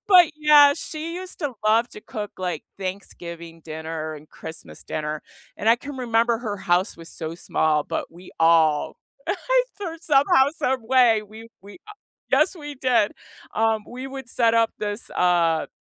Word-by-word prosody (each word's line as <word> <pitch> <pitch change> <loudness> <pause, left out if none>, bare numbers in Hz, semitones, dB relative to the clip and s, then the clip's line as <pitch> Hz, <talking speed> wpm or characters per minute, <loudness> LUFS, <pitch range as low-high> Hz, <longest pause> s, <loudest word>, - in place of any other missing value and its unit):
But 360 -5 +7
yeah, 295 -2 +7
she 325 +1 -5
used 370 0 -7
to 285 -5 -2
love 225 +3 +4
to - - -10
cook, 210 -1 -6
like, 180 -1 -3
Thanksgiving 170 -3 -7
dinner 160 0 -5
and 150 +1 -13
Christmas 160 0 -9
dinner, 150 0 -4 0.3
and 220 - -1
I 230 - +6
can 285 +2 -8
remember 235 -2 +1
her 215 -4 -4
house 185 +1 +1
was 165 0 -10
so 160 0 -5
small, 155 -3 +1
but - - -4
we 180 +2 -13
all, 160 -2 +4 0.3
I - - +2 0.2
though 345 -5 -4
somehow, 285 -1 +4
some 260 0 0
way, 240 -4 +5
we 220 +2 -12
we 200 - -12
a 420 +3 -14 0.4
Yes, 375 - +3
we 295 -2 -7
did. 250 -5 +2 0.4
Um, 220 -1 +1
we 255 +2 -7
would 265 -2 -8
set 230 -2 +2
up 230 -1 +3
this, 205 +2 -4
uh, 170 -3 +2
220 Hz, 165 wpm, -23 LUFS, 170-270 Hz, 0.4 s, But